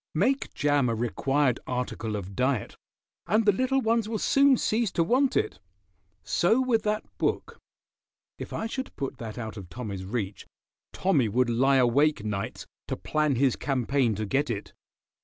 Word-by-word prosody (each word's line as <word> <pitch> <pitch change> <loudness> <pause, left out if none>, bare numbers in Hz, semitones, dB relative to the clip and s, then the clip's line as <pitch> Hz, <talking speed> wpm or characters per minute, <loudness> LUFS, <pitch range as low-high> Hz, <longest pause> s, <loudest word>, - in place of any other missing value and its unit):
Make 260 - +1
jam 145 -3 +2
a 115 - 0
required 130 +3 +1
article 125 -3 -3
of 100 -1 -6
diet 130 -3 0 0.5
and 215 +1 +2
the 205 - +6
little 260 +6 +1
ones 225 -2 +1
will 225 - -1
soon 275 +3 +4
cease 225 0 +1
to 165 - +2
want 260 +9 +2
it. - - -1 0.6
So 180 - +2
with 250 -4 +2
that 215 0 -1 0.2
book. - - -1 0.8
If - - -7
I - - -3
should 260 +3 -5
put 135 - -5
that 110 -1 -7
out 110 -2 -6
of 95 -4 -9
Tommy's 100 -6 -6
reach, 100 -1 -4 0.4
Tommy 145 - +1
would 120 +3 +1
lie 135 +4 +3
awake 130 0 +3
nights 100 -2 -4 0.2
to - - -3
plan 150 -3 0
his 130 0 +2
campaign 130 -3 0
to 110 +2 -3
get 140 +7 0
it. 105 -3 -4
135 Hz, 165 wpm, -27 LUFS, -, 0.8 s, the